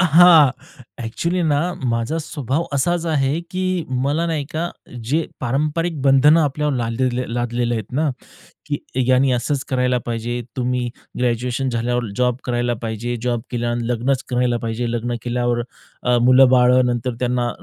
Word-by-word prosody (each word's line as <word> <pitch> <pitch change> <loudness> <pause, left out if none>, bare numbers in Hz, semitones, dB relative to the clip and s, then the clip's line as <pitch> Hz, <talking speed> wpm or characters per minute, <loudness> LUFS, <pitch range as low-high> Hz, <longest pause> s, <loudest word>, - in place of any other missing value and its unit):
अ, - - +5
हां. 165 -4 +8 0.5
अ‍ॅक्चुअली 170 +10 -2
ना, 150 -3 +2 0.3
माझा 115 +8 -1
स्वभाव 145 0 -2
असाच 170 +5 0
आहे 145 0 +1
की 185 0 -3 0.4
मला 150 +5 0
नाही 160 -4 -1
का, 170 +2 -2 0.3
जे 155 +8 0
पारंपरिक 150 +5 -1
बंधनं 140 +4 +5
आपल्यावर 150 0 0
लालले 120 +2 0 0.3
लादलेले 120 0 -1
आहेत 110 0 -5
ना, 155 -1 +2 0.6
की 145 -1 -2 0.3
यांनी 130 +1 +3
असंच 130 +3 -1
करायला 125 -1 +1
पाहिजे, 120 +1 -3 0.2
तुम्ही 125 -1 -1 0.3
ग्रॅज्युएशन 125 +2 0
झाल्यावर 120 +1 -1
जॉब 125 -1 +1
करायला 120 -1 0
पाहिजे, 115 +2 -3
जॉब 120 -2 0
केल्यावर 120 -1 -1
लग्नच 125 +3 0
करायला 125 -1 +1
पाहिजे, 115 +1 -2
लग्न 120 +1 -2
केल्यावर 120 0 0 0.4
अ, 125 0 +2
मुलं-बाळं, 125 0 +6
नंतर 120 0 -1
अं, 115 - -8
त्यांना 125 -1 0
125 Hz, 145 wpm, -20 LUFS, 120-145 Hz, 0.6 s, हां